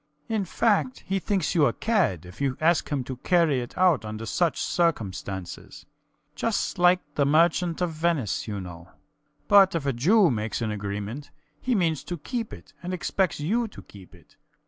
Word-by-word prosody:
In 215 -3 -1
fact, 230 +6 0
he 195 +1 -1
thinks 190 -3 -1
you 155 -5 +4
a 120 - 0
cad 180 - 0
if 90 +9 -12
you 135 -2 0
ask 165 +2 +2
him 140 -3 -1
to 130 0 -6
carry 165 -3 +2
it 120 - -9
out 180 -9 +4
under 110 +1 -6
such 170 +7 0
circumstances. 100 - -2 0.5
Just - - -2
like 180 +1 +5
the 145 - +1
Merchant 165 +4 +2
of 175 -2 0
Venice, 155 - -1
you 105 -2 -4
know. 85 -1 -9 0.6
But 195 -3 +6
if 160 -4 -2
a 140 - +1
Jew 175 - +4
makes 110 -2 -2
an 110 -2 -2
agreement, 105 +6 -5 0.3
he 250 -1 0
means 165 -6 +1
to 175 - -4
keep 230 - -4
it - - -12
and 180 +1 -3
expects 185 -1 -1
you 225 +11 0
to 210 - -12
keep 95 -2 -15
it. 90 - -22
155 Hz, 180 wpm, -26 LUFS, 110-180 Hz, 0.6 s, But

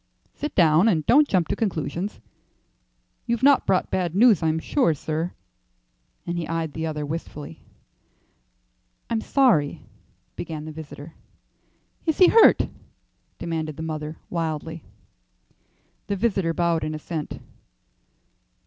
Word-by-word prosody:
"Sit 295 - -5
down, 165 +2 +5
and 160 -8 +2
don't 290 +4 +5
jump 180 - +1
to - - 0
conclusions. 190 -1 -3 1.1
You've 235 +1 -1
not 280 -1 +5
brought 185 -1 +1
bad 175 -2 -1
news, 220 -3 +5
I'm 160 -1 +1
sure, 165 - +1
sir;" 160 +4 -3 0.9
and 175 0 -2
he 165 - -4
eyed 165 -2 -2
the 160 0 -3
other 150 -1 -3
wistfully. 150 - -7 1.5
"I'm 225 -1 +1
sorry 220 - +2 0.3
" - - -42
began 155 -3 -6
the 155 - -6
visitor. 155 0 -10 0.9
"Is 320 - +1
he 365 - +7
hurt?" 455 - +6 0.7
demanded 160 -3 -4
the 160 - -5
mother, 155 -1 -5
wildly. 160 -1 -3 1.2
The 200 - -1
visitor 195 -5 0
bowed 170 -2 +1
in 155 0 -2
assent. 155 0 -5
165 Hz, 125 wpm, -24 LUFS, 155-200 Hz, 1.5 s, he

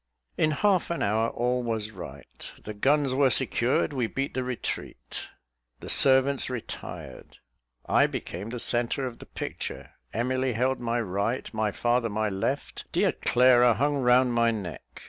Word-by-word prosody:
In 155 - +2
half 185 +4 +1
an 170 - -1
hour, 110 +3 +1
all 125 +1 -1
was 110 -3 -3
right; 95 -4 -10
"the 110 - -6
guns 135 +5 +2
were 135 0 +4
secured 125 +3 +2
we 125 -4 0
beat 135 +4 -3
the 130 - -2
retreat;" 125 -2 -5 0.5
the - - -2
servants 135 0 +4
retired. 125 -3 -8 0.5
I - - +4
became 95 +6 -6
the 120 +1 -5
centre 120 +3 +1
of 120 -2 -6
the - - -12
picture. - - -6 0.2
Emily 130 +3 -1
held 130 +4 0
my 120 0 -1
right, 105 +4 -2
my 110 -1 0
father 120 +2 0
my 110 0 -1
left; 95 -1 -3
dear - - +2
Clara 125 -1 +4
hung 145 +2 +1
round 125 -1 +4
my 115 0 +3
neck. 100 -7 -4
120 Hz, 155 wpm, -27 LUFS, 110-130 Hz, 0.5 s, were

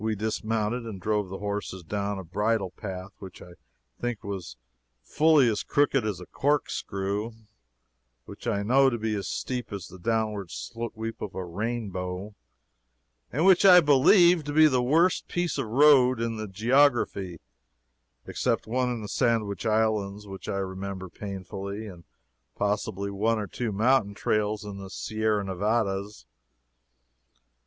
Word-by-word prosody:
We 110 0 0
dismounted 110 +2 -2
and 110 -4 -7
drove 105 0 -1
the 95 - -5
horses 100 -2 -4
down 100 +3 -3
a 95 - -6
bridle 105 +2 -1
path 95 0 -7
which 95 -2 -10
I 90 - -12 0.5
think 120 -3 -3
was 90 -11 -6 0.5
fully 150 - +4
as 110 -3 0
crooked 140 -3 +2
as 105 -4 -3
a 90 - -9
corkscrew, 105 -7 -1 0.9
which - - -10
I 100 -3 0
know 135 +5 +4
to 120 - -2
be 110 -1 -2
as 100 -2 -3
steep 125 -3 -4
as 100 -4 -5
the 95 0 -12
downward 110 -2 -1
sweep 110 - -6
of 100 - -6
a 95 - -4
rainbow, 100 -1 -4 1.0
and 155 +7 0
which 190 -1 +6
I 185 -2 +9
believe 170 +4 +5
to 145 - -4
be 155 +1 +7
the 130 -5 +3
worst 165 +8 +2
piece 175 -4 -1
of 130 - -2
road 130 0 +5
in 115 -1 -2
the 110 0 -4
geography, 110 - +2 0.9
except - - -1
one 125 +2 0
in 120 -3 -4
the - - -5
Sandwich 110 -4 0
Islands, 105 -2 0
which 95 -1 -8
I 100 - -1
remember 95 0 -5
painfully, 100 +2 -6
and 90 -5 -11 0.5
possibly 100 -1 -2
one 110 +3 +1
or 105 - -2
two 115 +4 -4
mountain 105 0 +2
trails 105 0 -1
in 100 -1 -7
the 95 -1 -8
Sierra 110 +1 -1
Nevadas. 100 - -1
105 Hz, 150 wpm, -27 LUFS, 100-120 Hz, 1.0 s, I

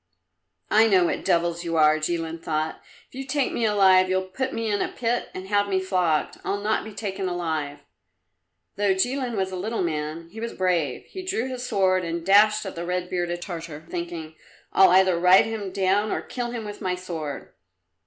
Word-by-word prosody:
"I 220 +1 +6
know 185 -4 +4
what - - -2
devils 170 -2 +1
you 165 -1 -2
are!" 155 0 +5
Jilin 165 0 -3
thought. 155 0 -2 0.3
"If - - -28
you 265 +1 -5
take 270 0 0
me 235 - 0
alive, 190 -3 +5
you'll 185 0 +1
put 260 +7 -2
me 230 -3 -3
in 205 -1 0
a - - +1
pit 240 0 -2
and 185 +1 -6
have 205 0 +1
me 190 -1 +2
flogged. 180 -5 0
I'll 200 - -1
not 215 +2 0
be 220 - -8
taken 195 -2 -3
alive!" 160 -5 -3 1.0
Though 200 -2 +2
Jilin 245 +4 -1
was 190 -1 -1
a - - -4
little 210 +3 -2
man, 155 0 -3
he 220 - -9
was 230 +1 -4
brave. 175 -7 0
He 375 - -8
drew 365 -10 -2
his 255 -1 -5
sword 185 -1 +2
and 170 0 -4
dashed 210 +2 +5
at 190 - -5
the 170 - -5
red 180 0 -3
bearded 175 -1 -2
Tartar, 165 -4 -7
thinking, 170 -2 -5 0.4
"I'll 190 -1 +7
either 185 -1 +4
ride 180 +2 +6
him 215 -4 -4
down 200 +2 +1
or - - -2
kill 245 -2 -4
him 235 -2 -5
with 205 0 -8
my 185 -2 -1
sword." 165 -5 -6
185 Hz, 200 wpm, -25 LUFS, 170-210 Hz, 1.0 s, I'll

